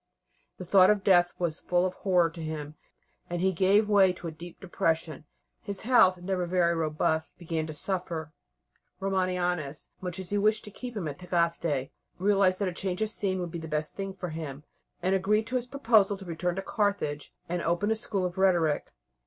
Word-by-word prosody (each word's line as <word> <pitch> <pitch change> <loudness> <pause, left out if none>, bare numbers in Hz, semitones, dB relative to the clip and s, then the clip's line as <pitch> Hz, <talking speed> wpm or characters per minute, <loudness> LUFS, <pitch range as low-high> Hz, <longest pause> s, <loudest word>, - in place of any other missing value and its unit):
The 185 - -7
thought 185 +1 +6
of 210 -2 +2
death 175 -3 +5
was 170 -3 -2
full 180 0 +1
of 185 - -1
horror 180 -4 +2
to 165 - -9
him, 155 -2 -5 0.6
and 175 0 -2
he 190 +2 +2
gave 195 +4 +4
way 200 -3 +5
to 175 - -11
a - - -4
deep 170 +2 -11
depression. 165 -5 -1 0.4
His 200 -3 -4
health, 215 -6 +5
never 180 0 -2
very 170 -1 +2
robust, 160 0 -1
began 165 -2 -3
to 155 - -6
suffer. 165 -2 -3 0.7
Romanianus, 180 -6 -1
much 180 -1 -4
as 190 -1 -6
he 205 - +1
wished 215 +1 +2
to 210 - -9
keep 245 +2 -7
him 180 -6 -2
at 145 -1 -6
Tagaste, 170 -6 0 0.3
realized 195 -1 +3
that 200 - -1
a 180 - -2
change 185 +2 -2
of 215 - -2
scene 190 -4 -1
would 175 -2 -4
be 170 - -5
the 160 - -7
best 150 0 -2
thing 195 -1 -5
for 180 -2 -5
him, 155 -3 -6 0.4
and 185 +1 +2
agreed 210 +3 +2
to 240 +3 -4
his 250 -1 0
proposal 225 -7 +3
to 195 - -11
return 175 +1 -2
to 195 - -3
Carthage 200 -9 -1 0.2
and 175 0 -2
open 175 +6 0
a - - +3
school 205 -4 -2
of 180 +1 -4
rhetoric. 175 -6 +2
180 Hz, 200 wpm, -28 LUFS, 165-195 Hz, 0.7 s, thought